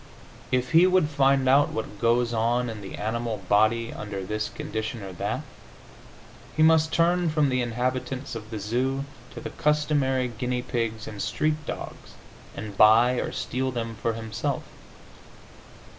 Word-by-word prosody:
If 125 0 0
he 170 +3 +7
would 185 -4 +3
find 135 -2 +3
out 140 +2 +5
what 105 -2 -5
goes 120 0 +2
on 120 +2 +1
in 110 -2 -8
the 95 - -7
animal 110 -1 -3
body 110 +3 +3
under 100 -2 -5
this 105 +2 -2
condition 110 +1 -5
or 95 -1 -7
that, 90 - -2 1.2
he 155 - +5
must 160 0 +5
turn 175 +1 +2
from 150 -2 +2
the 130 -1 +1
inhabitants 125 +2 -2
of 110 -2 -7
the 110 - -5
zoo 130 +6 -1 0.3
to - - -5
the - - -6
customary 145 -4 +1
guinea 125 +1 -3
pigs 115 -3 -3
and 105 -2 -6
street 155 0 0
dogs, - - -7 0.4
and 105 -1 -6
buy 115 +5 +6
or - - -2
steal 130 +1 -2
them 115 -2 -3
for 115 +1 -2
himself. 115 +5 -3
120 Hz, 155 wpm, -26 LUFS, 110-135 Hz, 1.2 s, he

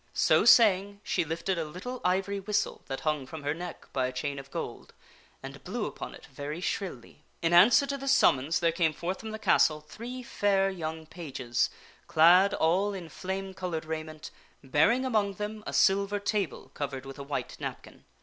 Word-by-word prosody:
So - - +4
saying, 200 -3 +5
she - - 0
lifted 170 +3 -2
a - - 0
little 185 +12 -7
ivory 195 +2 0
whistle 205 +2 -1
that 135 - -4
hung 150 -4 -1
from 160 0 -8
her 145 +1 0
neck 175 +1 -8
by 130 -1 +1
a - - -4
chain 140 +2 -3
of 135 0 -11
gold, - - -6 0.5
and 135 0 -9
blew 210 +6 -3
upon - - -7
it - - -14
very 145 +2 -6
shrilly. 155 -7 -5 0.2
In 165 +1 +2
answer 215 +11 +7
to 280 0 -3
this 275 0 0
summons 140 - +3
there 170 -1 +3
came 165 -1 +1
forth 180 +4 -4
from 220 - -7
the 220 - -5
castle 155 -7 +3
three 235 +11 -8
fair 195 -4 +1
young 160 -3 -5
pages, 135 -8 -2 0.4
clad 180 +5 +6
all 190 +5 +1
in 175 -4 -7
flame 190 +3 -5
colored 180 -4 -4
raiment, 155 -1 -6 0.3
bearing 160 - +3
among 210 -5 +1
them 210 +2 -5
a - - -3
silver 200 +1 +3
table 200 -4 -2
covered 135 -2 -5
with 135 +1 -9
a - - -5
white 140 +1 -4
napkin. - - -7
175 Hz, 185 wpm, -29 LUFS, 150-200 Hz, 0.5 s, answer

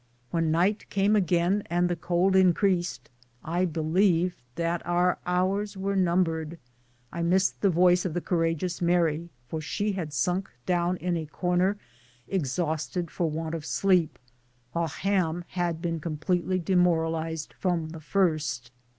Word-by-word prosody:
When 165 -1 +1
night 180 +7 +1
came 200 +2 +2
again 180 +1 +2
and 175 +1 +2
the 175 - -1
cold 175 +3 +1
increased, 185 -1 +2 0.4
I 175 +3 0
believed 175 +2 +1
that 170 0 -1
our 175 +1 +1
hours 195 +3 0
were 195 +1 -1
numbered. 170 -3 +1 0.5
I 170 - -4
missed 185 +3 +2
the 200 - +4
voice 180 +1 +4
of 175 -3 -3
the - - +1
courageous 170 0 -1
Mary, 170 -1 +1 0.2
for 160 +5 -4
she 205 +7 -1
had 175 -6 -4
sunk 180 +8 0 0.2
down 175 0 +1
in 180 0 -1
a 160 -2 -3
corner 180 +5 0 0.5
exhausted 165 +1 -2
for 170 -2 -1
want 160 +1 -4
of 165 -2 -4
sleep, 180 -1 +2 0.5
while 170 0 0
Ham 175 +1 -1
had 175 -2 -2
been 165 -1 -1
completely 175 +4 -1
demoral 170 -2 +2
ized 160 -1 -4
from 170 -4 -1
the 160 0 -8
first. 150 -9 0
175 Hz, 145 wpm, -27 LUFS, 165-185 Hz, 0.5 s, the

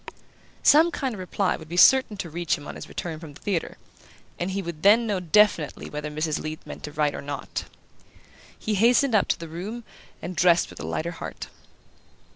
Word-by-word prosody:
Some 315 +4 +6
kind 270 -7 -3
of 205 - -8
reply 185 +1 -1
would 160 -1 -12
be 175 - -4
certain 255 0 +6
to 175 - -5
reach 170 0 -1
him 145 - -11
on - - -6
his - - -9
return 165 -3 -5
from 155 -3 -10
the - - -13
theatre, 190 -5 -2 0.6
and 175 - -1
he 195 +1 -2
would 165 -3 -6
then 215 +5 +6
know 205 -4 0
definitely 180 -3 +2
whether 150 0 -4
Mrs. 155 0 -2
Leath 155 0 -6
meant - - -9
to 150 - -7
write 150 0 0
or - - -5
not. 140 0 -5 0.9
He 215 - -2
hastened 240 +5 +4
up 210 - +3
to - - +1
his 165 - -7
room 200 +9 -6 0.4
and 180 +2 -6
dressed 175 0 +3
with - - -12
a - - -5
lighter 170 +2 -2
heart. 165 - -7
175 Hz, 205 wpm, -25 LUFS, 155-210 Hz, 0.9 s, Some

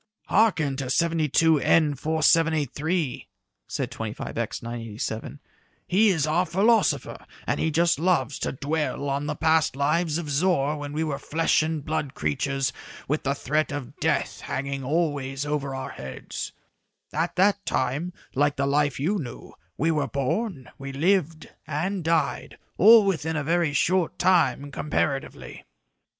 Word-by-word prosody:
"Hearken 165 -11 +3
to 135 - -3
72N 160 0 +3
4783," 160 0 +1 0.4
said - - -3
25X - - -4
987, 115 -1 -5 0.5
"he 210 +4 +4
is 160 -6 +2
our 160 +4 +2
philosopher, 220 +5 +2 0.2
and - - -1
he 160 - +1
just 165 0 +2
loves 170 -4 +1
to - - -2
dwell 145 0 -2
on 140 +2 -2
the 150 - -2
past 160 -3 +2
life 155 +3 +1
of 170 -3 -4
Zor 145 -1 +1
when 145 -1 -6
we 155 +2 -1
were 145 -3 -2
flesh 160 +3 +1
and 155 -2 -2
blood 150 -3 -2
creatures 130 - -1 0.3
with 150 +3 0
the 140 0 -1
threat 150 +3 0
of 145 -4 -6
death - - 0
hanging 140 0 -3
always 145 -2 -1
over 145 -2 -2
our 130 - -5
heads. 65 -1 -7 0.6
At 160 +3 -1
that 200 +2 +3
time, 150 +8 -1 0.2
like 145 +1 +2
the 140 - 0
life 145 -1 +1
you 190 +9 0
knew, 125 -7 -8 0.2
we 160 +3 +2
were 150 -3 0
born, 140 - -2
we 135 0 -6
lived 165 +2 +1 0.2
and 175 +5 -2
died, 160 -2 0 0.2
all 220 +2 +8
within 160 -4 -1
a 150 - -1
very 165 0 +1
short 180 +3 +1
time, 170 -6 +2
comparatively." 140 -1 -3
150 Hz, 140 wpm, -25 LUFS, 140-165 Hz, 0.6 s, all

